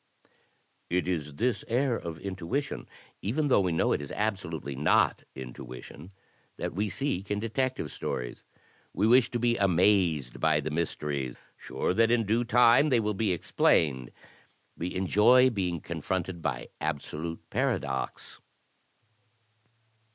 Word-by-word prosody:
It 90 +1 0
is 75 -5 -2
this 115 - 0
air 125 +1 +1
of 85 -6 -5
intuition, 95 - -4 0.3
even 145 +9 0
though 130 - +5
we 90 -2 0
know 80 - +1
it - - +1
is 70 - -7
abso 100 -5 -2
lutely 70 -4 -5
not 70 +3 +2
intuition, 65 +6 -9 0.5
that - - -3
we 105 +4 -1
seek 100 -6 -2
in 105 - 0
Detective 115 - -2
Stories. 60 -1 -5 0.5
We 100 - +2
wish 120 +2 +5
to 120 - -2
be 120 0 +1
amazed 90 -8 +2
by 80 -1 +3
the 75 +1 -3
mysteries, 75 -5 -2 0.2
sure - - -2
that 115 +3 +3
in 115 -2 +2
due 115 +4 +2
time 120 +5 +5
they 125 -4 +4
will 105 -1 0
be 105 0 0
explained. 70 -6 +2 0.7
We 90 +3 -4
enjoy 110 +8 +5
being 90 -6 -1
confronted 85 +2 -3
by - - -3
absolute 80 +2 -4
paradox. 65 - -2
95 Hz, 135 wpm, -28 LUFS, 80-115 Hz, 0.7 s, though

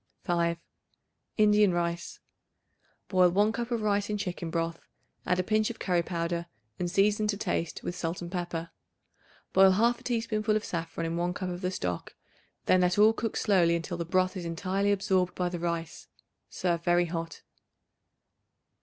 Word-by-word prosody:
5. 170 -2 +1 0.8
Indian 210 -3 +5
Rice. 170 0 -2 0.9
Boil 185 -2 +4
1 205 +4 +3
cup 235 +1 -4
of 235 -3 -1
rice 205 -1 +1
in 210 - -1
chicken 180 -4 -4
broth; 165 0 -2 0.5
add 180 - +2
a 185 - +1
pinch 215 +2 +1
of 235 - -6
curry 180 -2 +1
powder 170 0 -3 0.3
and 175 - -1
season 205 +3 +2
to 205 -1 0
taste 170 -5 -2
with 175 - -4
salt 170 0 -3
and 175 -1 -7
pepper. 175 -2 -4 0.8
Boil 190 0 +7
1/2 235 +4 +2
teaspoonful 220 -3 0
of 215 - -1
saffron 165 -1 -4
in 165 +1 -2
1 175 +1 -1
cup 185 -2 -3
of 175 0 -5
the 180 - 0
stock; 90 - -4 0.5
then 185 - +4
let 180 +1 +2
all 215 +2 +6
cook 225 0 -3
slowly 180 -5 +3
until 170 +1 -3
the 170 - -2
broth 185 +3 +1
is 185 - -4
entirely 185 +4 -1
absorbed 190 -2 +1
by 180 -1 0
the 175 -1 -5
rice. 170 -1 -4 0.4
Serve 170 -2 -1
very 175 0 +3
hot. 165 -1 -5
180 Hz, 170 wpm, -29 LUFS, 170-205 Hz, 0.9 s, Boil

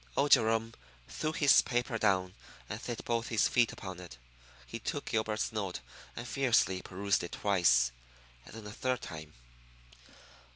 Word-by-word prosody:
Old 145 +1 +2
Jerome 115 0 +4 0.3
threw 155 - -3
his 150 -3 +5
paper 120 -1 -1
down 95 -3 +1 0.3
and 105 +3 -6
set 120 -2 -5
both 115 +1 -1
his 115 -6 +2
feet 120 -2 +3
upon 95 -2 -8
it. 85 -9 -11 0.5
He - - -7
took - - -4
Gilbert's 110 -1 -1
note 100 -5 -3 0.4
and 120 - -6
fiercely 115 -7 +2
perused 100 +2 -1
it 85 - -7
twice, 75 -12 +3 0.5
and - - -13
then 110 -2 -9
a 105 - -7
third 125 +1 -1
time. 80 -1 -8
110 Hz, 155 wpm, -32 LUFS, 95-120 Hz, 0.5 s, his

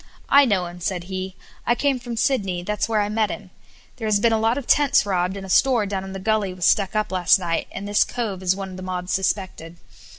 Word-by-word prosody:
"I 280 0 +7
know 195 -7 +1
him," 175 0 -9
said 180 0 -3
he. 185 +1 -5 0.3
"I 240 - +3
came 275 0 0
from 240 -1 -6
Sydney; 195 -9 0
that's 210 +4 -2
where 215 -2 +2
I 205 - 0
met 215 0 0
him. - - -8 0.5
There 225 -3 -4
has 210 -1 +3
been 230 +2 +3
a 220 - +2
lot 225 +3 +1
of 280 - -4
tents 290 -4 +3
robbed, 185 -1 -1
and 195 - -7
a - - -9
store 240 +2 +3
down 195 -1 -3
in 190 - -8
the 195 - -6
Gully 205 -2 0
was 180 -2 -2
stuck 200 0 +2
up 215 -2 0
last 180 0 +4
night, 170 -3 -2
and 200 +1 -6
this 205 0 +3
cove 220 -6 -4
is 185 0 +1
one 195 -1 -6
of 185 - -9
the - - -8
mob 180 -1 -5
suspected. 185 -3 -2
195 Hz, 255 wpm, -22 LUFS, 185-220 Hz, 0.5 s, I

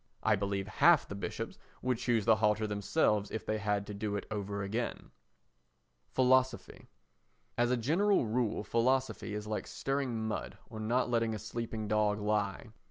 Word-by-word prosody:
I 110 - +4
believe 100 0 -2
half 170 +8 +5
the - - -6
bishops 100 - -5 0.2
would 125 -2 0
choose 115 -5 +1
the 110 -1 +5
halter 110 0 +2
themselves 105 0 +1
if 110 - -5
they 110 0 -1
had 100 -1 0
to 105 - -7
do 105 0 -3
it 100 - -3
over 100 -1 -3
again. 115 +5 -3 1.0
Philosophy 130 -1 +1 0.7
As 120 0 +2
a 125 - +2
general 170 - +2
rule 115 -1 0
philosophy 120 0 0
is 105 0 -4
like 105 0 -3
stirring 130 -5 -2
mud 110 - -4
or 110 - -7
not 120 +3 0
letting 115 -2 +1
a - - -3
sleeping 110 0 -4
dog 105 0 +2
lie. 105 0 -1
110 Hz, 165 wpm, -32 LUFS, 105-120 Hz, 1.0 s, half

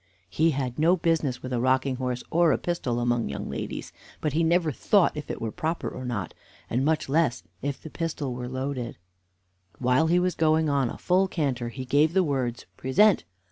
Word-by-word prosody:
He 160 - +3
had 130 -3 -2
no 170 +4 +4
business 160 -7 0
with 130 0 -4
a 120 - +1
rocking 130 +1 +1
horse 125 -1 -2
or 170 0 +4
a - - +2
pistol 130 -9 -2
among 120 - 0
young 70 - -4
ladies, - - -5 0.3
but 150 -3 -1
he 165 +2 +2
never 165 -1 +2
thought 195 - +3
if 150 - -6
it - - -4
were 110 - -3
proper 165 +3 -2
or 130 - -6
not, 105 -8 -3 0.4
and 125 +3 +1
much 155 +1 +1
less 140 - +1 0.2
if 140 0 -3
the 160 - -10
pistol 155 -6 -3
were 125 0 -5
loaded. 130 -2 -4 0.8
While 130 +5 +3
he 170 +2 +3
was 180 0 +2
going 160 -1 +2
on 140 -4 +1
a - - -7
full 185 +2 +2
canter, 135 -9 -1
he 130 +2 -6
gave 145 +5 +3
the 190 0 +4
words, 130 -6 -2
"Present! 195 +10 +3
140 Hz, 200 wpm, -26 LUFS, 125-165 Hz, 0.8 s, no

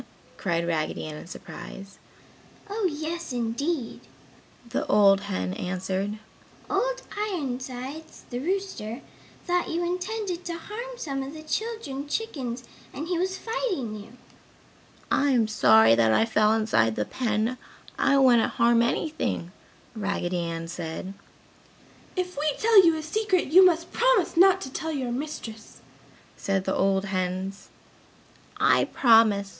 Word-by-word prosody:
cried 170 -3 -1
Raggedy 160 -2 -2
Ann 155 -1 -6
in 150 - -10
surprise. 195 +2 -10 0.7
"Oh 410 -2 0
yes, 315 +2 -4
indeed!" 245 +3 -2 0.7
the 235 - -2
old 200 -1 +5
hen 90 - -2
answered, 190 - -3 0.5
"Old - - 0
Ironsides, 275 -7 -5
the 245 - -3
rooster, 305 - -3 0.4
thought 355 -1 0
you 340 +1 -1
intended 365 0 -3
to 340 -1 -4
harm 475 +8 -7
some 275 - -3
of 275 +3 -6
the 310 - -9
children 310 -7 -4
chickens 265 - -3 0.3
and 305 +4 -6
he 350 -2 0
was 375 +1 -1
fighting 380 - -3
you!" 215 +2 -10 1.0
"I 285 - +3
am 230 -3 +3
sorry 110 - +6
that 115 -1 +4
I 165 - +4
fell 215 -1 +3
inside 215 - +2
the 105 - -1
pen, 230 0 -1 0.4
I 275 0 +4
wouldn't 250 -4 +4
harm 235 0 +4
anything," 235 - -1 0.4
Raggedy 195 -4 -2
Ann 165 -1 -4
said. 170 +2 -6 1.0
"If 365 -1 -2
we 305 +1 +1
tell 440 -3 +6
you 330 -2 +5
a 310 - -5
secret 370 -2 0
you 375 +2 +9
must 340 -2 +3
promise - - +2
not 380 +2 +6
to 265 - -6
tell 320 - -3
your 260 -5 -2
mistress!" 240 -5 -6 0.6
said 195 -1 -1
the 190 - 0
old 195 0 +1
hens. 190 +1 -3 0.9
"I - - +4
promise! 225 -5 +4
255 Hz, 135 wpm, -26 LUFS, -, 1.0 s, you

